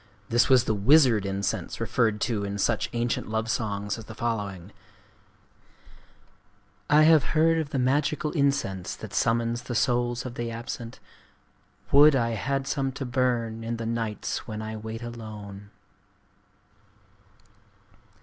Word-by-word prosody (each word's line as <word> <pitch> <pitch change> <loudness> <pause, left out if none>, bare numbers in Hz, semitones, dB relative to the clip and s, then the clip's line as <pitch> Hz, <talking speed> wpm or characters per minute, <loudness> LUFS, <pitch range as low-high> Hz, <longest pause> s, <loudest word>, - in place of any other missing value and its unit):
This 120 +4 +3
was 130 -2 +6
the 110 - 0
wizard 115 -1 +4
incense 100 0 -3
referred 110 -3 +1
to 110 -4 0
in 100 0 -3
such 100 - 0
ancient 120 -2 -2
love 110 +1 -1
songs 105 -1 -2
as 110 - -10
the 110 - -10
following:— 100 -6 -3 2.2
"I 150 +1 +6
have 155 -3 +6
heard 165 +1 +4
of 155 -3 -3
the 140 - -2
magical 145 +4 +1
incense 140 - 0
that - - -10
summons 115 +1 +1
the 120 0 -6
souls 120 +1 0
of 125 - -5
the 120 -1 -4
absent: 115 0 -7 0.9
Would 145 +1 +7
I 115 -3 +1
had 135 +5 -2
some 135 -1 -1
to 135 - -5
burn, 120 -3 -1
in 115 +1 -3
the 115 - -5
nights 115 -2 -3
when 110 -1 -5
I 110 0 -5
wait 110 +2 -7
alone!" 105 -4 -8
115 Hz, 140 wpm, -26 LUFS, 110-130 Hz, 2.2 s, Would